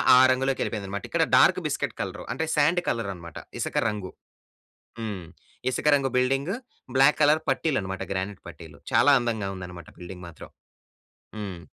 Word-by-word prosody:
ఆ - - +8
రంగులోకెళ్ళిపోయిందన్నమాట. 110 -7 -1
ఇక్కడ - - +2
dark - - +6
biscuit - - -2
colour. - - -5
అంటే 160 - -1
సాండ్ 155 +4 +3
కలరన్నమాట. 95 -8 -3 0.2
ఇసక - - -2
రంగు. 105 -4 -4 0.9
హ్మ్. 105 -5 -4 0.5
ఇసక 130 - -2
రంగు 135 -1 0
బిల్డింగు. 135 - +1 0.4
Black 135 +3 +6
colour 150 +2 +5
పట్టీలన్నమాట. 100 -12 -1
గ్రానైట్ 95 +1 -4
పట్టీలు. 80 -4 -12
చాలా 145 +4 +6
అందంగా 110 -5 -2
ఉందన్నమాట 90 -2 -9
బిల్డింగ్ 90 0 -9
మాత్రం. 85 - -11 0.9
హ్మ్. 95 -5 -5
105 Hz, 135 wpm, -26 LUFS, 95-135 Hz, 0.9 s, ఆ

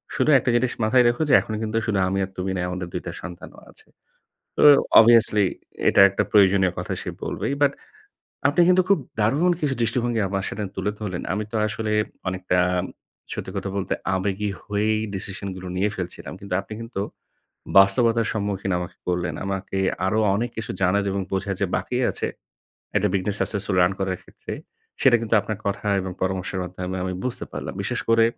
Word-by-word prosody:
শুধু - - +2
১ - - 0
টা - - +2
জিনিস 120 +1 +1
মাথায় 125 +4 +4
রেখো 120 +6 -2
যে - - +4
এখনও 110 - -5
কিন্তু 110 0 -2
শুধু 100 -3 +1
আমি 95 +1 0
আর - - -14
তুমি 95 +1 -2
না 90 - -1
আমাদের 90 -1 -4
২ - - -3
টা - - -3
সন্তানও 90 -1 -9
আছে।" - - -15 0.7
তো - - -1 0.4
obviously 110 -2 +5 0.4
এটা - - +5
১ 100 - -9
টা 105 - +4
প্রয়োজনীয় 95 -3 +5
কথা - - -4
সে - - -6 0.2
বলবেই, - - -2
বাট 140 -1 +4 0.8
আপনি 175 - +2
কিন্তু 180 0 +5
খুব 200 -3 +5 0.2
দারুন 145 +12 +3
কিছু 140 -3 0
দৃষ্টিভঙ্গি 115 0 0
আমার 95 0 -2
সাথে 105 - -4
তুলে 95 +2 -1
ধরলেন। 95 -4 -4
আমি 105 +2 -1
তো - - -1
আসলে 110 0 -3 0.4
অনেকটা 90 0 -1 0.7
সত্যি - - -5
কথা 100 - -3
বলতে 100 - -1 0.2
আবেগী 100 +2 -1
হয়েই 105 +1 0 0.2
ডিসিশন 100 +1 -5
গুলো 90 0 -7
নিয়ে 100 +3 +2
ফেলছিলাম, 90 -2 -6
কিন্তু 100 -2 -4
আপনি 105 +2 -9
কিন্তু 115 -4 -4 0.8
বাস্তবতার 115 +4 +4
সম্মুখীন 100 -2 -2
আমাকে 90 +1 -7
করলেন। 90 0 -1
আমাকে 95 0 -3 0.3
আরো 105 +3 +1 0.2
অনেক 120 +3 -1
কিছু 115 - -3
জানার 95 +2 +3
এবং 100 0 -1
বোঝায় 95 0 -2
যে - - +4
বাকি 125 - -3
আছে, - - -3 0.7
১ 105 - +3
টা - - +4
বিজনেস 100 +1 0
successful 100 0 -1
run 90 +2 +3
করার 95 -1 -1
ক্ষেত্রে, - - -10 0.5
সেটা 125 -2 +6
কিন্তু 115 0 -1
আপনার 105 0 -5
কথা 100 +1 -2
এবং 95 -1 -5
পরামর্শের 95 0 -2
মাধ্যমে 90 +1 -8
আমি 95 - -3
আমি 95 0 -3
বুঝতে 125 - -2
পারলাম। - - -5
বিশেষ - - -2
করে 115 0 +5
100 Hz, 190 wpm, -23 LUFS, 95-115 Hz, 0.8 s, সেটা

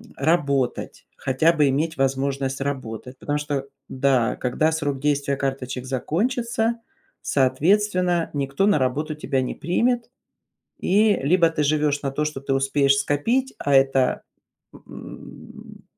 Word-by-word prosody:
работать. 140 -4 -1
Хотя 145 +6 +2
бы 150 -4 +3
иметь 155 +5 -1
возможность 135 0 -1
работать, 130 -2 -5
потому 145 0 -2
что, 145 -2 -3 0.2
да, 130 -3 +1
когда 155 +5 0
срок 145 -4 -2
действия 140 -1 0
карточек 130 -2 -3
закончится, 230 - -1 0.4
соответственно, 175 +6 +1
никто 140 +5 0
на 200 -8 +3
работу 150 +4 -1
тебя 140 -3 -1
не 130 - -3
примет. 235 - 0 0.7
И 210 +2 +3
либо 165 +4 +3
ты 155 -2 -1
живешь 150 0 +1
на 135 - -1
то, 150 +3 -1
что 150 -3 -4
ты 135 0 -1
успеешь 135 +1 +2
скопить, 225 - 0
а 140 -1 0
это, 135 -1 +3 0.5
м, - - -12
145 Hz, 130 wpm, -23 LUFS, 135-165 Hz, 0.7 s, бы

